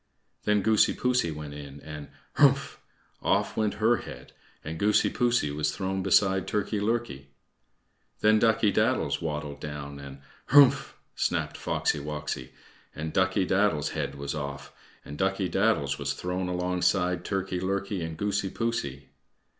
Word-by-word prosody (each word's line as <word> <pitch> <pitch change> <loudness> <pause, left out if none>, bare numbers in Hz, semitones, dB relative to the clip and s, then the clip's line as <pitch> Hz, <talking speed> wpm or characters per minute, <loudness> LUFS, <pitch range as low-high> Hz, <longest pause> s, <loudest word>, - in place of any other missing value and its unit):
Then 105 -1 +2
Goosey 110 0 +4
poosey 125 -7 +1
went 75 -2 -6
in, 70 -1 -9
and 75 -1 -8 0.3
"Hrumph!" - - +4 0.4
off - - +1
went 110 -2 0
her 115 +2 +3
head - - -10 0.3
and 80 +1 -6
Goosey 105 +1 +3
poosey 120 - +1
was 75 +1 -1
thrown 95 0 -2
beside 95 0 +3
Turkey 105 0 -1
lurkey. 110 - -2 0.9
Then 110 0 +5
Ducky 110 -2 +3
daddles - - +1
waddled 75 -3 -4
down, 70 -1 -7
and 70 0 -10 0.3
"Hrumph!" 140 -2 +6 0.2
snapped - - -1
Foxy - - -1
woxy, 75 -3 -5 0.5
and 80 +1 -5
Ducky 95 0 +2
daddles's 95 -6 +2
head - - -3
was 70 0 -4
off, 70 -2 -6 0.3
and 75 - -8
Ducky 95 0 +1
daddles 90 -10 +1
was 70 -1 -1
thrown 90 +4 -3
alongside 90 0 0
Turkey 95 -2 -2
lurkey 100 0 -2
and 80 -1 -5
Goosey 100 0 -1
poosey. 70 - -3
90 Hz, 140 wpm, -27 LUFS, 75-105 Hz, 0.9 s, Hrumph